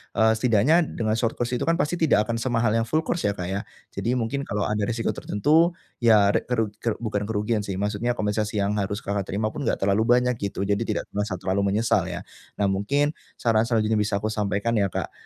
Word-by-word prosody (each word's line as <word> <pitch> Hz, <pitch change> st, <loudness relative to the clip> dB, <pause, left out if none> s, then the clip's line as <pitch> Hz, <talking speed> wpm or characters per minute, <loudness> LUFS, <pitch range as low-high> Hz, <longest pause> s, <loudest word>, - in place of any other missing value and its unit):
eee, 110 Hz, 0 st, +4 dB
setidaknya 125 Hz, +9 st, +3 dB
dengan 110 Hz, 0 st, -1 dB
short 115 Hz, -1 st, 0 dB
course 120 Hz, 0 st, -2 dB
itu -, -, -3 dB
kan 165 Hz, -, +3 dB
pasti 170 Hz, +1 st, -1 dB
tidak 145 Hz, -10 st, +4 dB
akan 115 Hz, +1 st, -3 dB
semahal 115 Hz, -2 st, +1 dB
yang 115 Hz, +1 st, +1 dB
full 155 Hz, +6 st, +1 dB
course 170 Hz, -8 st, -1 dB
ya 100 Hz, -, -1 dB
Kak 90 Hz, -, -4 dB
ya. 95 Hz, +2 st, -1 dB, 0.3 s
Jadi 120 Hz, +2 st, -1 dB
mungkin 125 Hz, +4 st, -2 dB
kalau 100 Hz, 0 st, -1 dB
ada 105 Hz, +1 st, -1 dB
resiko 115 Hz, -1 st, -1 dB
tertentu 160 Hz, -, +2 dB, 0.2 s
ya 105 Hz, -4 st, +5 dB
re -, -, +1 dB
keru 115 Hz, -4 st, 0 dB
keru 115 Hz, -2 st, -1 dB
bukan 105 Hz, -3 st, -1 dB
kerugian 105 Hz, +1 st, 0 dB
sih 100 Hz, -2 st, -4 dB
maksudnya 105 Hz, +5 st, -1 dB
kompensasi 105 Hz, 0 st, -1 dB
yang 100 Hz, 0 st, +1 dB
harus 100 Hz, +1 st, -3 dB
Kakak 100 Hz, -1 st, -2 dB
terima 110 Hz, +2 st, -1 dB
pun -, -, -4 dB
enggak -, -, +1 dB
terlalu 100 Hz, +2 st, +3 dB
banyak 125 Hz, 0 st, +2 dB
gitu, 100 Hz, -1 st, -3 dB
jadi 100 Hz, 0 st, 0 dB
tidak -, -, -1 dB
merasa 105 Hz, -1 st, -2 dB
terlalu 100 Hz, +2 st, 0 dB
menyesal 105 Hz, -4 st, +2 dB
ya. 90 Hz, -1 st, -5 dB, 0.3 s
Nah 100 Hz, -, 0 dB
mungkin, 140 Hz, +10 st, +1 dB, 0.2 s
saran 115 Hz, -1 st, +2 dB
selanjutnya 110 Hz, -2 st, +1 dB
bisa 105 Hz, -1 st, 0 dB
aku 110 Hz, -, 0 dB
sampaikan 105 Hz, +1 st, -1 dB
ya 100 Hz, -, +2 dB
Kak, -, -, -4 dB
110 Hz, 220 wpm, -24 LUFS, 100-120 Hz, 0.3 s, ya